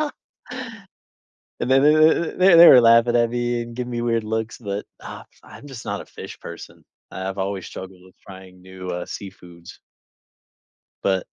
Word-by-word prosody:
and 250 -6 -9 0.9
then 135 +1 +4
then 155 +2 +3
th 185 -1 +6
they 170 - +10
were 125 - +9
laughing 115 +1 +4
at 120 -1 +2
me, 120 0 -2
and 115 0 -10
giving 125 0 -5
me 120 - -3
weird 115 -2 -1
looks, 110 +4 -4
but, 100 -4 -5
ugh, - - -10 0.2
I'm - - -14
just 130 -4 -10
not - - -4
a - - -18
fish - - -11
person. 85 - -11 0.3
I 95 0 -5
I've 95 +1 -6
always 95 -2 -4
struggled 95 -1 -10
with 95 - -21
trying 95 -1 -14
new, 95 0 -10
uh, 90 0 -4
seafoods. 90 -3 -11 1.3
But 95 -2 0
115 Hz, 170 wpm, -21 LUFS, 95-130 Hz, 1.3 s, they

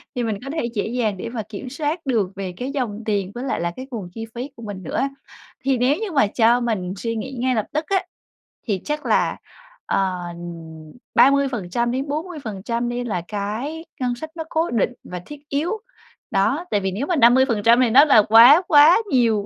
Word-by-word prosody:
thì 245 - -1
mình 220 -3 -2
có - - -5
thể 315 -6 -1
dễ 205 - -1
dàng 220 -4 -1
để 230 - -5
mà 230 -2 -4
kiểm 220 +4 -7
soát 300 +4 -3
được 225 -8 +1
về 190 -2 -5
cái 255 +5 -4
dòng 235 -7 -3
tiền 200 -3 -1
với 245 - -5
lại 270 - -2
là 170 0 -1
cái 260 +8 -9
nguồn 210 -7 -5
chi 225 0 -6
phí 250 +4 -5
của 230 - -12
mình 200 -3 -7
nữa. - - -2 0.6
Thì 265 -1 +2
nếu 250 +4 +2
như 430 +2 -4
mà 275 -9 +3
cho 230 +3 +3
mình 210 -7 -2
suy 230 +3 -3
nghĩ 235 +4 -5
ngay 255 +1 +1
lập 215 -2 0
tức 305 +2 -1
á, 385 -1 +1 0.6
thì 195 -5 -1
chắc 300 0 -3
là, - - +1 0.5
ờ, 195 -1 +1 1.1
30%-40% 250 - 0
đi 240 0 -3
là 205 -7 -2
cái 225 +11 -4 0.2
ngân 245 -1 0
sách 315 +6 -7
nó 325 - -4
cố 325 +2 0
định 235 +1 +1
và 180 - -7
thiết 295 -1 -10
yếu, 295 +6 -1 0.6
đó, 270 - +1
tại 205 - +2
vì 190 -1 -2
nếu 230 +10 -3
mà 355 - +1
50% 240 -3 +4
thì 250 - +3
nó 270 +6 +7
là 275 -8 +6
quá 240 +9 +9
quá 300 +5 +7
nhiều. 225 -5 +2
240 Hz, 200 wpm, -22 LUFS, 215-280 Hz, 1.1 s, quá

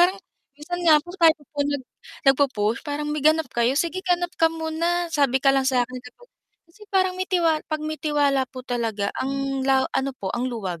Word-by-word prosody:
parang 365 +3 +4 0.4
minsan 350 +4 -5
nga 325 -3 +6
po 350 - -10
tayo 325 -1 +6 0.2
nag 285 -1 -1 0.5
nag-po-push 235 -6 0
parang 295 0 -4
may 300 - -2
ganap 310 +2 +3
kayo 240 +3 +1
"Sige 340 +4 0
ganap 355 -1 0
ka 325 - +6
muna 330 +2 -1
sabi 280 -4 +2
ka 270 +1 +3
lang 270 -1 +2
sakin" 255 -1 0 0.7
kasi 420 - -20
parang 375 -1 +2
may 370 - -2 0.4
pag 310 -1 -2
mi 310 0 -4
tiwala 285 -3 +1
po 255 -1 -9
talaga 225 -5 -2
ang 275 0 -2
la 265 -1 +4
ano 270 0 -1
po 190 -1 -4
ang 245 +1 -1
luwag 190 -8 -5
285 Hz, 185 wpm, -23 LUFS, 255-325 Hz, 0.7 s, nga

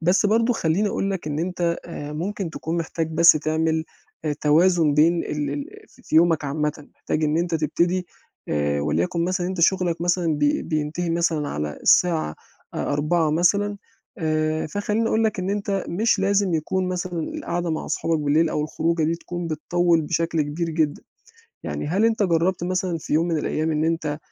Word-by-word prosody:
بس 180 +5 +3
برضه 225 +3 +3
خلّيني 195 0 +1
أقول 195 0 -1
لك 190 -5 -4
إن 150 -1 -2
أنت 170 0 -1
آآ 150 -3 -7
ممكن 185 +3 -3
تكون 160 +1 -4
محتاج 165 -1 -2
بس 170 +2 +7
تعمل 160 +1 0 0.4
آآ 150 - 0
توازن 160 0 +4
بين 165 +3 +3
ال 150 -1 -2
ال 145 0 -4 0.2
في - - -22
في - - -1
يومك 165 -2 +4
عامةً، 150 +1 -3
محتاج 155 0 -2
إن 150 +1 +1
أنت 170 0 -1
تبتدي 170 +4 0 0.4
آآ 75 -1 0
وليكن 85 - 0
مثلًا 185 0 -1
أنت 185 -1 -3
شُغلك 175 -1 +2
مثلًا 175 -2 +1
بي 145 0 +2
بينتهي 155 +2 -2
مثلًا 165 -3 0
على 75 0 -4
الساعة 165 - +3 0.4
أ - - -3
16:00 155 +2 +1
مثلًا 200 +6 +2 0.4
آآ 155 -1 0
فخلّيني 210 +6 -1
أقول 225 +1 +2
لك 215 - 0
إن 185 +1 -2
أنت 200 -1 -1
مش 215 +4 +1
لازم 195 -2 +2
يكون 180 +4 -1
مثلًا 180 -1 -3
القعدة 175 0 -2
مع 160 - -3
صحابك 165 -1 0
بالليل 150 +3 +2
أو 150 - -1
الخروجة 165 +1 0
دي 160 +2 +1
تكون 175 +1 -6
بتطوّل 170 +2 +1
بشكل 165 0 0
كبير 165 +3 -3
جدًا. 155 -2 0 0.6
يعني - - -4
هل 190 +8 +1
أنت 225 -1 +2
جرّبت 175 0 +1
مثلًا 180 -1 -1
في - - -7
يوم 165 +3 +2
من 165 -2 0
الأيام 155 +1 -1
إن 155 0 0
أنت 160 -2 -1
165 Hz, 180 wpm, -23 LUFS, 155-180 Hz, 0.6 s, بس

